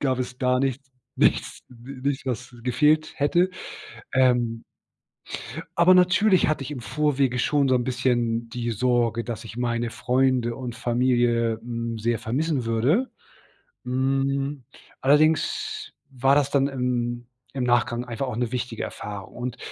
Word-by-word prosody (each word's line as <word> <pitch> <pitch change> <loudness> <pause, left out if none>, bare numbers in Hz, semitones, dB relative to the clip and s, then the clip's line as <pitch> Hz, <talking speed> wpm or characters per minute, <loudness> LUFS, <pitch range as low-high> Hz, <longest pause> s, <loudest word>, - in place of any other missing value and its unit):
gab 130 -3 0
es 125 0 -4
gar 125 -1 +2
nichts 135 0 -2 0.3
nichts - - +1
ni 125 +2 -11
nicht 135 -1 -6
was 125 -1 -4
gefehlt 150 +6 +2
hätte. 170 +6 +2 0.7
Ähm 120 -3 +2 1.2
Aber 175 +2 +7
natürlich 185 +1 +4
hatte 155 -2 0
ich 135 - -6
im 140 -4 -5
Vorwege 135 -1 0
schon 140 +1 +2
so 130 - +3
'n 125 - +2
bisschen 120 -2 0
die 120 0 -3
Sorge, 115 0 +1
dass 115 -1 -5
ich 115 +1 -9
meine 120 -1 -1
Freunde 125 -1 +1
und 125 -1 -6
Familie, 120 -2 +1
hm, 115 -1 -4
sehr 115 +1 -1
vermissen 140 +3 -1
würde. 130 - +1 0.7
Hm, 135 +2 -1 0.4
allerdings 160 - +2 0.2
war 135 0 +2
das 145 -1 +2
dann 140 -1 +2
im 120 -3 -2 0.3
im 130 - -2
Nachgang 120 0 +1
einfach 120 +3 -4
auch 125 - -4
'ne 120 -2 -1
wichtige 120 -2 -3
Erfahrung. 100 -2 -7
Und 125 0 -5
125 Hz, 145 wpm, -24 LUFS, 120-140 Hz, 1.2 s, Aber